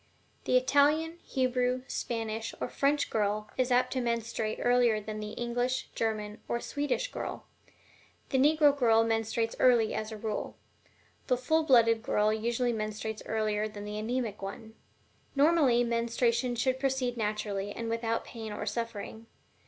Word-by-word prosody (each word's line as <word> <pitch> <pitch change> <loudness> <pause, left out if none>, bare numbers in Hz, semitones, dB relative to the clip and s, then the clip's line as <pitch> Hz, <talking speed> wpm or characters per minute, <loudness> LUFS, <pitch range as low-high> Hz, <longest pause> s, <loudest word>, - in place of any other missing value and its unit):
The 255 - +4
Italian, 300 +6 +2
Hebrew, 255 -1 0
Spanish, 225 -1 -3
or - - -2
French 285 +1 +1
girl 210 0 -1
is 255 -1 0
apt 250 +1 +3
to 260 - 0
menstruate 230 -2 -2
earlier 245 -3 +3
than 215 0 -6
the 210 0 -6
English, 245 +2 -2
German, 215 -1 -2
or 235 - -1
Swedish 290 - -2
girl. - - -5 0.8
The 265 - +1
Negro 295 +1 +5
girl 225 -4 +4
menstruates 225 0 0
early, 235 -4 +4
as 215 +1 -3
a 220 - -6
rule. 215 0 -4 0.7
The 250 - +2
full 315 +6 +2
blooded 230 -6 +4
girl 215 -1 +2
usually 235 +2 0
menstruates 215 0 -4
earlier 215 -1 0
than 205 -1 -8
the 210 0 -4
anemic 225 -2 -2
one. 220 +3 -7 0.6
Normally, 280 -5 +4
menstruation 235 +1 0
should 255 +2 0
proceed 265 -2 0
naturally 210 -2 -2
and 230 +2 -5
without 230 0 -1
pain 225 -2 -7
or 210 - -4
suffering. 230 -1 -5
230 Hz, 145 wpm, -30 LUFS, 215-255 Hz, 0.8 s, Negro